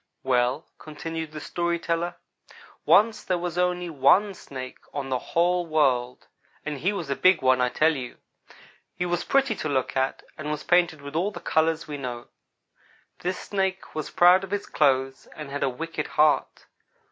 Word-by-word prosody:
"Well," 130 +3 +1
continued 160 +1 -6
the 155 - -7
story 170 +2 -1
teller, 170 +1 -2 0.7
"once 220 +1 +4
there 185 - 0
was 175 0 -3
only 180 0 0
one 170 +7 +3
Snake 130 -7 -9 0.2
on 140 -2 -3
the 130 -1 0
whole 175 +4 +1
world, 130 -6 +1 0.4
and 150 -2 -4
he 180 +9 +1
was 175 -8 -4
a - - +1
big 185 -1 +4
one, 130 -1 +4
I 125 - +2
tell 160 +5 +2
you. 125 -3 -6 0.8
He 180 - -2
was 175 -1 -1
pretty 275 -3 +2
to 155 - -3
look 130 -2 -1
at, 130 0 -1 0.2
and 150 0 -4
was 150 -1 -3
painted 170 -4 +2
with 140 +1 -8
all 180 +5 +1
the 210 - -8
colors 160 0 0
we 150 -1 -5
know. 125 -3 -6 0.9
This 180 +1 -2
snake 190 -1 -3
was 155 -2 -4
proud 180 +2 +5
of 195 - -6
his 205 0 -2
clothes 135 -2 +1
and 150 -3 -8
had 145 - -4
a 135 - +2
wicked 160 +4 -4
heart. 150 0 +1
155 Hz, 180 wpm, -25 LUFS, 135-175 Hz, 0.9 s, proud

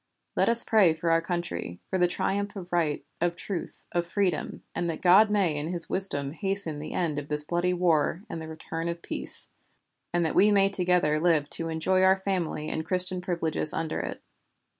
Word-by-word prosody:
Let - - +2
us 235 0 +9
pray 195 -8 +4
for 165 +1 -1
our 165 0 +3
country, 170 - -4
for 190 - 0
the 180 - +4
triumph 200 +3 -2
of 180 -2 -8
right, 160 -4 0 0.2
of 175 0 +1
truth, 175 0 -6
of 175 - 0
freedom, 180 -4 -2
and 170 - -2
that 165 - -4
God 195 +4 +6
may 195 -7 +1
in 150 +3 -3
His 175 -2 -3
wisdom 145 -8 +2
hasten 195 -3 -3
the 150 - -7
end 160 -5 -1
of 145 - -8
this 150 0 -1
bloody 175 +3 0
war 170 0 +1
and 165 - -6
the 160 - -7
return 160 +1 -5
of 170 0 -6
peace; - - -3 0.6
and 175 -1 +1
that 160 - -1
we 210 +2 +5
may 195 -1 +4
together 180 -5 +1
live 160 -3 +1
to 165 0 -1
enjoy 175 +4 +1
our 190 0 +5
family 180 -6 -2
and 160 - -3
Christian 180 +2 0
privileges 165 -4 -2
under 160 -1 -2
it." - - -6
175 Hz, 200 wpm, -27 LUFS, 160-185 Hz, 0.6 s, us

